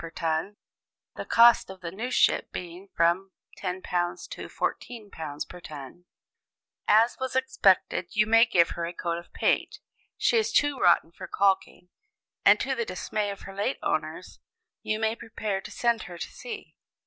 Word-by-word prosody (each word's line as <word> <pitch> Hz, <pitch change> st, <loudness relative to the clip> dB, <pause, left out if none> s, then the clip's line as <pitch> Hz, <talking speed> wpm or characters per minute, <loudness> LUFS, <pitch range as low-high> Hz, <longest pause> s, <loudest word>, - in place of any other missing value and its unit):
per 165 Hz, -, -7 dB
ton 165 Hz, +5 st, -2 dB, 0.6 s
(the -, -, -6 dB
cost 235 Hz, -2 st, +6 dB
of 190 Hz, -1 st, -11 dB
a 170 Hz, -, -4 dB
new 225 Hz, +7 st, -4 dB
ship -, -, +2 dB
being 180 Hz, +2 st, -7 dB
from 175 Hz, +3 st, +2 dB, 0.3 s
£10 180 Hz, -1 st, -2 dB
to -, -, -7 dB
£14 165 Hz, -11 st, -5 dB
per 180 Hz, -, -11 dB
ton), 150 Hz, +1 st, -10 dB, 0.8 s
as 225 Hz, +3 st, +4 dB
was 260 Hz, -1 st, -3 dB
expected, 200 Hz, -9 st, +2 dB
you 215 Hz, 0 st, +4 dB
may 225 Hz, +1 st, +6 dB
give 175 Hz, -8 st, +3 dB
her 170 Hz, -1 st, -3 dB
a 175 Hz, -, -6 dB
coat 170 Hz, -1 st, -3 dB
of 170 Hz, -, -15 dB
paint -, -, 0 dB, 0.4 s
she 470 Hz, -, +3 dB
is 440 Hz, 0 st, +1 dB
too 290 Hz, -8 st, +2 dB
rotten 170 Hz, -1 st, +4 dB
for 185 Hz, +2 st, -9 dB
caulking 190 Hz, -2 st, 0 dB, 0.5 s
and -, -, +6 dB
to -, -, -1 dB
the 470 Hz, -, -1 dB
dismay 210 Hz, -, -3 dB
of 200 Hz, -1 st, -7 dB
her 195 Hz, -, -9 dB
late 205 Hz, +7 st, -1 dB
owners, -, -, -3 dB, 0.4 s
you 215 Hz, -, -1 dB
may 220 Hz, 0 st, 0 dB
prepare 215 Hz, -4 st, -4 dB
to -, -, -9 dB
send 235 Hz, -2 st, 0 dB
her 175 Hz, -1 st, -9 dB
to -, -, -6 dB
sea. 450 Hz, -4 st, -9 dB
195 Hz, 170 wpm, -27 LUFS, 175-225 Hz, 0.8 s, cost